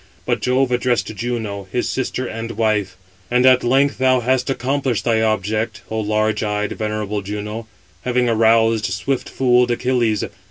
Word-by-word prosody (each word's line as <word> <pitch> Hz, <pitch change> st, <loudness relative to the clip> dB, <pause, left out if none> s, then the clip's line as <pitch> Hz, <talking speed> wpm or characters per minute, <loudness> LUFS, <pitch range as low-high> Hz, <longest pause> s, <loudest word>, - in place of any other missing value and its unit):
But -, -, 0 dB
Jove 130 Hz, +1 st, +1 dB
addressed 120 Hz, -3 st, 0 dB
Juno, 110 Hz, -5 st, -4 dB
his 120 Hz, -, -1 dB
sister 130 Hz, 0 st, -2 dB
and 115 Hz, 0 st, -5 dB
wife: 105 Hz, -4 st, 0 dB, 0.3 s
"And 125 Hz, +1 st, +3 dB
at 130 Hz, -1 st, +6 dB
length 135 Hz, +4 st, +2 dB
thou 130 Hz, -1 st, +3 dB
hast 130 Hz, +2 st, +1 dB
accomplished 130 Hz, -4 st, -1 dB
thy 115 Hz, -2 st, +2 dB
object, 110 Hz, 0 st, -1 dB
O 110 Hz, -, -1 dB
large 110 Hz, 0 st, 0 dB
eyed, 105 Hz, -1 st, -1 dB
venerable 105 Hz, -1 st, -3 dB
Juno, 105 Hz, +3 st, -5 dB, 0.3 s
having 125 Hz, 0 st, +1 dB
aroused 115 Hz, -1 st, +3 dB
swift 100 Hz, +8 st, -2 dB
fooled 125 Hz, -1 st, +3 dB
Achilles. 120 Hz, -3 st, +1 dB
115 Hz, 150 wpm, -20 LUFS, 105-125 Hz, 0.3 s, at